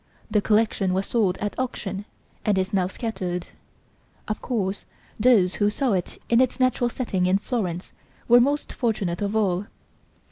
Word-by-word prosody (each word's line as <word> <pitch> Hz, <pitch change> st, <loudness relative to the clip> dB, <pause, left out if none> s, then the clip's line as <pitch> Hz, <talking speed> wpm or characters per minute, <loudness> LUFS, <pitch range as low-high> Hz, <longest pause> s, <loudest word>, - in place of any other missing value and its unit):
The 210 Hz, -, +3 dB
collection 210 Hz, -3 st, +2 dB
was 190 Hz, +1 st, 0 dB
sold 205 Hz, -6 st, +1 dB
at 205 Hz, +3 st, -4 dB
auction, 205 Hz, -6 st, -3 dB, 0.4 s
and 210 Hz, -3 st, +2 dB
is 190 Hz, +2 st, -1 dB
now 185 Hz, -2 st, +2 dB
scattered. 185 Hz, -5 st, -3 dB, 0.8 s
Of 215 Hz, -, -3 dB
course 200 Hz, -5 st, -2 dB, 0.3 s
those 210 Hz, -6 st, +5 dB
who 205 Hz, -, +5 dB
saw 245 Hz, +2 st, 0 dB
it 180 Hz, -2 st, -2 dB
in 235 Hz, +1 st, +4 dB
its 260 Hz, 0 st, +1 dB
natural 255 Hz, -1 st, +2 dB
setting 195 Hz, -8 st, -1 dB
in 185 Hz, +1 st, +4 dB
Florence, 195 Hz, -6 st, -3 dB, 0.3 s
were 240 Hz, +1 st, +7 dB
most 285 Hz, +4 st, 0 dB
fortunate 210 Hz, -8 st, -1 dB
of 205 Hz, +1 st, -1 dB
all. 195 Hz, -3 st, +1 dB
210 Hz, 155 wpm, -24 LUFS, 190-235 Hz, 0.8 s, were